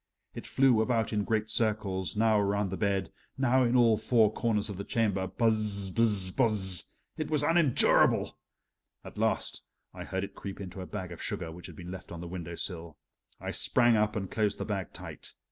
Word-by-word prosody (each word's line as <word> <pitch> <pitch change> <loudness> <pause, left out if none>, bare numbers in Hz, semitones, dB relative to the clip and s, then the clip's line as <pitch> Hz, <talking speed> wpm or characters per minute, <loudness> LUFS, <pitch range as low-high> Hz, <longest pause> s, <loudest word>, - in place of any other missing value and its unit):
It - - -8
flew 130 -4 +4
about 115 -1 0
in 105 -1 +1
great 110 -1 0
circles, 105 -5 -1
now 110 -1 +4
around 100 -1 0
the - - -2
bed, 100 -1 -1 0.3
now 130 0 +3
in 120 +1 +1
all 115 -3 +5
four 110 -1 +3
corners 110 -3 0
of 100 -4 -6
the 100 - -4
chamber 100 -4 0
"buzz 105 -4 0
buzz 105 -4 +2
buzz" 100 -7 +1 0.3
it 155 - -3
was 150 -2 +3
unendurable! 165 -3 +3 0.7
At - - -10
last - - -1 0.3
I - - -8
heard 95 0 -3
it 100 0 -6
creep 100 0 -8
into 95 -1 -7
a 90 - -7
bag 95 -4 -6
of 85 - -9
sugar 80 - -4
which 85 +2 -10
had - - -11
been 90 0 -8
left 95 0 -9
on 85 - -7
the 85 - -7
window 85 -1 -6
sill. 85 -3 -4 0.4
I - - -4
sprang 120 -2 +3
up 105 0 +1
and 95 -3 -4
closed 105 -2 0
the - - -4
bag 100 -3 -3
tight. - - -10
105 Hz, 195 wpm, -29 LUFS, 95-115 Hz, 0.7 s, all